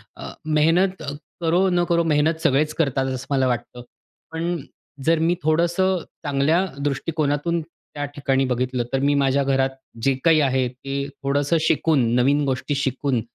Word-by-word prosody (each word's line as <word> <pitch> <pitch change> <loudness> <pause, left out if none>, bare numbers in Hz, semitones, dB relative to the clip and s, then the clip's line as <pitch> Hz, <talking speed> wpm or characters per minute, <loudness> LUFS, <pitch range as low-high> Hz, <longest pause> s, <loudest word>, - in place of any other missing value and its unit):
अ, - - -8
मेहनत 165 +5 +2
अ, 140 - -4 0.3
करो 175 +3 +2
न 175 -1 +2
करो, 170 -1 +3
मेहनत 160 +1 +1
सगळेच 150 +3 +2
करतात 135 -4 0
असं 130 -1 -4
मला 135 -2 +2
वाटतं. 120 0 -3 0.5
पण 165 0 -2 0.4
जर 165 0 +3
मी 165 +2 +2
थोडंसं 175 +4 +2 0.3
चांगल्या 145 +6 +2 0.2
दृष्टिकोनातून 145 +3 -1 0.3
त्या 145 0 -3
ठिकाणी 135 -2 +1
बघितलं, 125 0 -1
तर 135 - +2
मी 140 +1 +3
माझ्या 140 0 +2
घरात 135 -1 +2 0.3
जे 135 - +3
काही 160 -2 +5
आहे 130 -2 +1
ते 135 +2 -5 0.2
थोडंसं 145 +4 +1
शिकून, 160 -3 +2
नवीन 140 +4 +3
गोष्टी 135 +2 -1
शिकून, 135 -2 -1
145 Hz, 155 wpm, -22 LUFS, 135-165 Hz, 0.5 s, काही